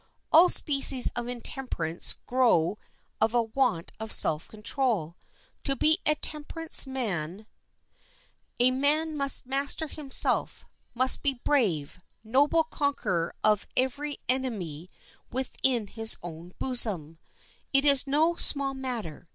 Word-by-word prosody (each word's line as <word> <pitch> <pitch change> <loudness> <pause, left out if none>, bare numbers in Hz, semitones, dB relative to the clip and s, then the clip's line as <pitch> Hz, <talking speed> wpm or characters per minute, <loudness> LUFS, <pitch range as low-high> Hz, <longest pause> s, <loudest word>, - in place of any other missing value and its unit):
All 345 +3 +6
species 275 -3 +4
of 240 0 -3
intemperance 240 - -2
grow 220 -8 +1 0.4
of 225 +2 +1
a 240 - +2
want 225 -7 -2
of 220 0 -7
self 155 0 +4
control. 215 - -3 0.5
To 275 - 0
be 315 +6 +1
a 305 - +3
temperance 305 0 0
man 205 -7 -5 1.1
a 250 +1 +4
man 300 +4 -1
must 275 -3 +4
master 275 +4 -2
himself, 290 -2 -1 0.3
must 255 +2 +3
be 280 -2 +1
a 240 - -23
brave, 185 - -1 0.2
noble 285 +8 +1
conqueror 255 - -3
of 210 -1 +1
every 280 +3 -2
enemy 195 - -3 0.4
within 255 -2 -2
his 225 +2 +3
own 175 +1 -10
bosom. 190 - 0 0.5
It 275 +1 +2
is 280 -1 +6
no 315 +5 +1
small 275 -2 +1
matter. 240 - -6
255 Hz, 120 wpm, -26 LUFS, 205-280 Hz, 1.1 s, All